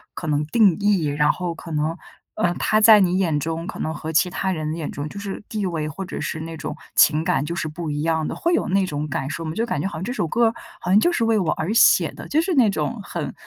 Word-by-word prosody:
可 -, -, -6 dB
能 150 Hz, -1 st, +1 dB
定 200 Hz, 0 st, +4 dB
义？ 200 Hz, -5 st, +2 dB
然 150 Hz, +1 st, +2 dB
后 180 Hz, -2 st, -4 dB
可 165 Hz, 0 st, -10 dB
能， 155 Hz, +1 st, -1 dB, 0.4 s
呃， 175 Hz, -, +1 dB
他 215 Hz, -, +2 dB
在 215 Hz, -1 st, +8 dB
你 185 Hz, -1 st, +2 dB
眼 165 Hz, -6 st, +1 dB
中 165 Hz, +2 st, -3 dB
可 -, -, -7 dB
能 160 Hz, -, -2 dB
和 160 Hz, 0 st, -5 dB
其 170 Hz, +4 st, +3 dB
他 190 Hz, +2 st, -2 dB
人 155 Hz, -3 st, -3 dB
眼 165 Hz, -3 st, -4 dB
中 145 Hz, +1 st, -5 dB
就 200 Hz, -, -8 dB
是 200 Hz, 0 st, -6 dB
地 210 Hz, -2 st, -2 dB
位， 160 Hz, -4 st, -2 dB
或 175 Hz, +6 st, -6 dB
者 -, -, -6 dB
是 160 Hz, -, -3 dB
那 165 Hz, +1 st, -6 dB
种 155 Hz, 0 st, -5 dB, 0.2 s
情 155 Hz, +1 st, +5 dB
感 175 Hz, -5 st, +1 dB
就 170 Hz, -, -4 dB
是 165 Hz, -, -2 dB
不 155 Hz, +1 st, -5 dB
一 145 Hz, 0 st, -2 dB
样 160 Hz, -1 st, 0 dB
的， -, -, -4 dB
会 345 Hz, +1 st, 0 dB
有 -, -, +1 dB
那 195 Hz, +1 st, +2 dB
种 150 Hz, -3 st, -3 dB
感 135 Hz, -1 st, -3 dB
受 160 Hz, +2 st, -5 dB
吗？ 155 Hz, -, -3 dB
就 160 Hz, -, -8 dB
是 230 Hz, -, +1 dB
感 150 Hz, -11 st, -2 dB
觉 190 Hz, -, -1 dB
好 -, -, -7 dB
像 165 Hz, -, -5 dB
这 240 Hz, -, -3 dB
首 210 Hz, -9 st, -1 dB
歌 230 Hz, +6 st, +2 dB, 0.3 s
好 -, -, -5 dB
像 205 Hz, -, +6 dB
就 345 Hz, -, +3 dB
是 290 Hz, -, 0 dB
为 225 Hz, -1 st, +2 dB
我 170 Hz, -5 st, 0 dB
而 170 Hz, +7 st, -2 dB
写 230 Hz, -, +5 dB
的， -, -, -10 dB
就 310 Hz, -, +2 dB
是 365 Hz, +2 st, -1 dB
那 245 Hz, -6 st, +5 dB
种 150 Hz, -7 st, -2 dB
很， -, -, -5 dB
170 Hz, 310 characters per minute, -22 LUFS, 155-200 Hz, 0.4 s, 在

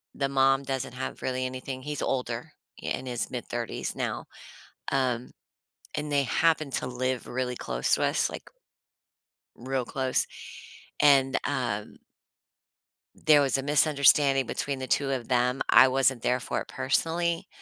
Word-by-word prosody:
the 140 Hz, -1 st, -1 dB
mom 135 Hz, 0 st, +3 dB
doesn't 135 Hz, -2 st, -3 dB
have 130 Hz, -, -5 dB
really 130 Hz, 0 st, -2 dB
anything 130 Hz, +1 st, -5 dB
He's 150 Hz, +2 st, -4 dB
older, 125 Hz, +3 st, -2 dB, 0.3 s
in 130 Hz, -, -3 dB
his 120 Hz, -2 st, -2 dB
mid-thirties 120 Hz, -1 st, -4 dB
now, -, -, -3 dB, 0.7 s
um, 125 Hz, -3 st, 0 dB, 0.6 s
and 150 Hz, 0 st, -3 dB
they 140 Hz, -1 st, +3 dB
happen 155 Hz, +3 st, +1 dB
to 130 Hz, -, -2 dB
live 130 Hz, 0 st, -2 dB
really 125 Hz, 0 st, -2 dB
close -, -, 0 dB
to -, -, -1 dB
us, -, -, +1 dB
like -, -, -8 dB, 1.1 s
real 130 Hz, +1 st, -3 dB
close, 130 Hz, 0 st, 0 dB, 0.7 s
and, 135 Hz, -2 st, +5 dB
um 120 Hz, -7 st, -2 dB, 1.3 s
there 150 Hz, -2 st, +7 dB
was 135 Hz, -1 st, +1 dB
a 135 Hz, -, -3 dB
misunderstanding 140 Hz, -2 st, +4 dB
between 140 Hz, -1 st, -3 dB
the 130 Hz, -, -5 dB
2 135 Hz, +2 st, +1 dB
of 125 Hz, -3 st, -3 dB
them. 125 Hz, +1 st, +1 dB
I 130 Hz, -, +8 dB
wasn't 130 Hz, -2 st, +2 dB
there 125 Hz, +1 st, +1 dB
for -, -, -3 dB
it -, -, -8 dB
personally, 165 Hz, +4 st, 0 dB
130 Hz, 145 wpm, -27 LUFS, 125-140 Hz, 1.3 s, I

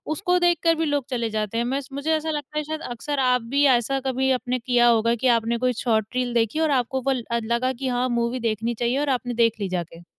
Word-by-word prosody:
उसको 360 Hz, +1 st, +1 dB
देख 350 Hz, -1 st, +3 dB
कर 330 Hz, -1 st, +4 dB
भी 325 Hz, 0 st, -1 dB
लोग 290 Hz, -4 st, -1 dB
चले 235 Hz, -3 st, -1 dB
जाते 215 Hz, 0 st, -3 dB
हैं, 235 Hz, -, 0 dB
मैं 270 Hz, +3 st, -1 dB
स 270 Hz, -, -14 dB
मुझे 280 Hz, +3 st, -2 dB
ऐसा 315 Hz, +1 st, -2 dB
लगता 300 Hz, -1 st, -4 dB
है 305 Hz, -, 0 dB
शायद 310 Hz, +1 st, -5 dB
अक्सर 280 Hz, +4 st, -3 dB
आप 250 Hz, -1 st, +3 dB
भी 285 Hz, 0 st, +4 dB
ऐसा 270 Hz, +3 st, 0 dB
कभी 265 Hz, 0 st, +1 dB
आपने 250 Hz, 0 st, -1 dB
किया 240 Hz, 0 st, +3 dB
होगा 230 Hz, 0 st, +3 dB
कि 255 Hz, +3 st, -1 dB
आपने 230 Hz, +1 st, -1 dB
कोई 250 Hz, +1 st, +1 dB
शॉर्ट 220 Hz, -1 st, 0 dB
रील 250 Hz, -1 st, -1 dB
देखी 230 Hz, +5 st, +1 dB
और 315 Hz, -2 st, +2 dB
आपको 260 Hz, 0 st, 0 dB
वो 270 Hz, +2 st, 0 dB
ल 255 Hz, -3 st, -1 dB
अ, 235 Hz, -, +1 dB
लगा 235 Hz, +3 st, 0 dB
कि 260 Hz, +1 st, -5 dB
हाँ 250 Hz, 0 st, 0 dB
मूवी 235 Hz, +2 st, -1 dB
देखनी 225 Hz, 0 st, -1 dB
चाहिए 240 Hz, +3 st, 0 dB
और 290 Hz, -1 st, -1 dB
आपने 245 Hz, -1 st, -1 dB
देख 230 Hz, -1 st, +1 dB
ली 200 Hz, -, -2 dB
जाके। 175 Hz, -2 st, -5 dB
250 Hz, 265 wpm, -23 LUFS, 235-275 Hz, -, कर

